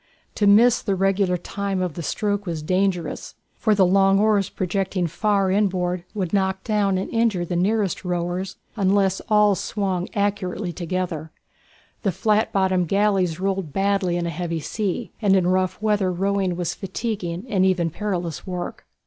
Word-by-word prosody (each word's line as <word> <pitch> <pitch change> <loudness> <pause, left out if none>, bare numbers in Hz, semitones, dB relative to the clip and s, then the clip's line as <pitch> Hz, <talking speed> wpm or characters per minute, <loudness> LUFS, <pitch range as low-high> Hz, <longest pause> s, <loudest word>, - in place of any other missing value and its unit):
To 205 - +1
miss 230 +4 +6
the 195 - -1
regular 195 -1 +1
time 195 +2 -3
of 180 -3 -1
the 170 - -6
stroke 205 +4 -2
was 165 -3 -3
dangerous, 185 +1 -1 0.2
for 215 -2 +1
the 195 -2 +5
long 195 +1 +4
oars 210 -2 +2
projecting 185 0 -1
far 195 +2 +1
inboard 180 -3 0
would 190 -4 -2
knock 190 -1 0
down 205 -3 +1
and 190 - -2
injure 225 -6 +1
the 175 - -3
nearest 200 +2 0
rowers, 180 +1 -2 0.2
unless 195 -2 +2
all 210 -1 +5
swung 190 -1 -2
accurately 200 -3 -1
together. 170 -2 -3 0.7
The 195 - +1
flat 210 +4 +1
bottomed 185 -2 +1
galleys 195 -3 +1
rolled 190 -5 -2
badly 195 -3 +1
in 175 - -2
a 170 - -2
heavy 165 0 -3
sea, 205 +7 -3
and 200 -3 +4
in 185 -2 +3
rough 185 0 +1
weather 205 -3 +2
rowing 190 0 0
was 175 -1 -2
fatiguing 195 -2 -4
and 190 -5 +1
even 180 -3 +2
perilous 175 -3 -3
work. 180 -1 -5
190 Hz, 160 wpm, -23 LUFS, 180-200 Hz, 0.7 s, miss